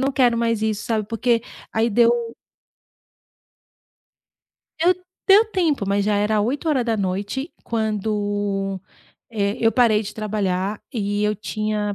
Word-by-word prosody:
não 270 Hz, +1 st, +1 dB
quero 245 Hz, -3 st, +3 dB
mais 230 Hz, -2 st, 0 dB
isso, 215 Hz, -1 st, -1 dB
sabe, 215 Hz, -3 st, -1 dB
porque 230 Hz, 0 st, +1 dB, 0.3 s
aí 225 Hz, +1 st, +2 dB
deu 235 Hz, +1 st, +2 dB, 2.5 s
Deu 355 Hz, +2 st, +5 dB, 0.4 s
deu 410 Hz, +3 st, +8 dB
tempo, 320 Hz, -, +1 dB
mas 200 Hz, 0 st, +1 dB
já 210 Hz, -1 st, +2 dB
era 210 Hz, +1 st, +2 dB
20:00, 235 Hz, -, -1 dB
quando, 205 Hz, -3 st, -1 dB, 0.5 s
eh, 205 Hz, -2 st, -1 dB
eu 225 Hz, -1 st, +3 dB
parei 230 Hz, -4 st, +4 dB
de 210 Hz, -, -7 dB
trabalhar, 205 Hz, -2 st, -2 dB
e 205 Hz, -2 st, -1 dB
eu 210 Hz, 0 st, +1 dB
tinha 210 Hz, 0 st, -2 dB
215 Hz, 120 wpm, -22 LUFS, 205-235 Hz, 2.5 s, deu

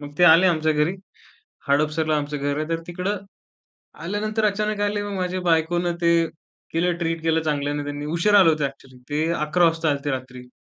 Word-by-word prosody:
मग 145 Hz, 0 st, -8 dB
ते 180 Hz, -, +6 dB
आले 175 Hz, +2 st, +7 dB
आमच्या 160 Hz, -2 st, +2 dB
घरी. 150 Hz, +4 st, +1 dB, 0.7 s
हडपसरला 155 Hz, +2 st, +1 dB
आमचं 150 Hz, 0 st, -3 dB
घर 145 Hz, 0 st, -2 dB
आहे 155 Hz, 0 st, -3 dB
तर 165 Hz, 0 st, -1 dB
तिकडं, 185 Hz, +4 st, -2 dB, 0.9 s
आल्यानंतर 215 Hz, +3 st, -1 dB
अचानक 210 Hz, +1 st, -1 dB
आले 205 Hz, 0 st, -2 dB
मग 205 Hz, -1 st, -5 dB
माझ्या 185 Hz, 0 st, -2 dB
बायकोनं 170 Hz, +2 st, +1 dB
ते, 170 Hz, 0 st, +4 dB, 0.6 s
केलं 175 Hz, +2 st, +1 dB
ट्रीट 165 Hz, -1 st, -2 dB
केलं 160 Hz, 0 st, +2 dB
चांगल्याने 145 Hz, -1 st, -1 dB
त्यांनी. 145 Hz, 0 st, -5 dB
उशिरा 205 Hz, +4 st, +5 dB
आले 185 Hz, -4 st, +6 dB
होते 155 Hz, -2 st, +1 dB
एक्चुअली, 135 Hz, -1 st, -9 dB
ते 155 Hz, +3 st, 0 dB
11 170 Hz, +2 st, +2 dB
वाजता 165 Hz, -1 st, +1 dB
आलते 145 Hz, 0 st, -2 dB
रात्री. 130 Hz, -1 st, -6 dB
160 Hz, 180 wpm, -23 LUFS, 145-180 Hz, 0.9 s, आले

